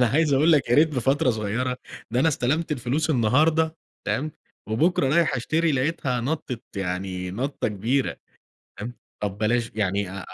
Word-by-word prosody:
أنا 125 - +5
عايز 145 +3 +2
أقول 155 +5 +5
لَك 145 -5 +3
يا - - +5
ريت 155 +4 +6
بفترة 135 -1 +2
صغيرة، 115 +3 -1 0.3
ده 120 +2 +1
أنا 160 - +4
استلمت 155 +3 0
الفلوس 145 +4 -1
النهارده، 155 +6 +3 0.3
تمام، 155 +3 -1 0.4
وبُكرة 135 +6 +2
رايح 170 -6 +3
أشتري 160 +6 +1
لقيتها 135 -2 0
نطت 125 -3 -3
يعني 90 -1 -3
نطة 130 +8 -2
كبيرة، 115 +7 0 0.6
تمام. 120 +3 -5 0.3
طب 100 -1 -2
بلاش 115 +2 +1
يعني، 100 -2 0
آآ، 95 -1 -6
125 Hz, 155 wpm, -25 LUFS, 110-155 Hz, 0.6 s, ريت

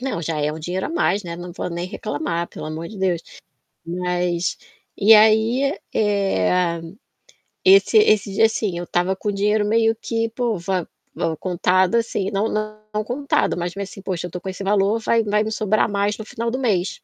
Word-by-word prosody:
Não, 255 -10 -3
já 160 -1 -2
é 150 +1 0
um 155 - -7
dinheiro 180 +4 -3
a - - -6
mais, 260 - +1
né, 170 -1 -5
não 175 +1 -7
vou 180 - -4
nem 170 +1 -3
reclamar, 185 - -3
pelo 155 - -8
amor 160 +2 -5
de 215 - -10
Deus. 180 -3 +1 0.7
Mas 180 0 -1 0.4
e 215 +3 +6
aí, 220 +7 +4 0.2
eh, 180 - +1 0.8
esse 390 +3 +6
esse 215 - +3
dia, 225 - +5
assim, 210 -5 -2
eu 175 - -4
estava 180 +2 0
com 210 - -4
o - - -3
dinheiro 210 +1 +1
meio 225 +1 +2
que, 230 0 -2
pô, 235 -3 -1
va 180 0 -2 0.3
va 160 -1 -1
contado 185 +4 +1
assim, 210 -4 -1
não 205 +2 0 0.4
não 215 0 -1
contado, 270 0 0
mas 175 +1 -3
meio 200 - -4
assim: 195 - -11
"Poxa, 180 -2 -3
eu - - -15
tô 180 - -6
com 190 - -7
esse 190 +1 -5
valor, 200 +2 +2
vai 230 0 +2
vai 210 +1 +2
me 220 - -3
sobrar 215 0 +1
mais 205 +1 0
no 220 - -6
final 230 +2 -3
do 255 - -2
mês". 200 -8 0
200 Hz, 200 wpm, -21 LUFS, 180-220 Hz, 0.8 s, e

